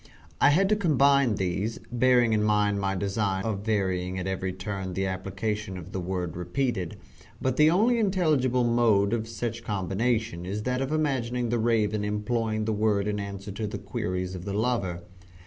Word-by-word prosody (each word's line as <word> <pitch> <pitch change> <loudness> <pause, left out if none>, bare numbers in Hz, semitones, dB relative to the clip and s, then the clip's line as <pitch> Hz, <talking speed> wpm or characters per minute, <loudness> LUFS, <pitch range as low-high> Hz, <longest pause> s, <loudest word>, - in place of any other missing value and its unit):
I - - +7
had 185 +7 +4
to 215 - +4
combine 140 - +3
these, 100 +4 -2
bearing 120 -1 +4
in 105 - +2
mind 105 -1 +2
my 95 0 0
design 100 0 -1
of 110 -3 -1
varying 95 -4 -1
at 90 - -3
every 95 0 -2
turn 95 -1 -5
the 95 +1 0
application 95 +1 -3
of 90 +1 -9
the 95 - -3
word 90 -2 -3
repeated, 90 +1 -2 0.4
but 130 -1 0
the 150 +2 +6
only 225 +8 +3
intelligible 155 - +2
mode 115 -4 +3
of 115 -1 -1
such 115 +1 -4
combination 105 -1 -1
is 100 +4 -4
that 125 +2 -1
of 135 +2 -2
imagining 125 -6 0
the 120 0 +1
Raven 110 -2 +1
employing 110 +1 -1
the 110 - 0
word 105 -1 +1
in 105 0 -1
answer 100 0 -6
to 105 +2 -3
the - - -4
queries 90 0 -3
of 90 -2 -6
the 100 +1 -4
lover. 100 -6 -1
105 Hz, 180 wpm, -27 LUFS, 95-120 Hz, 0.4 s, I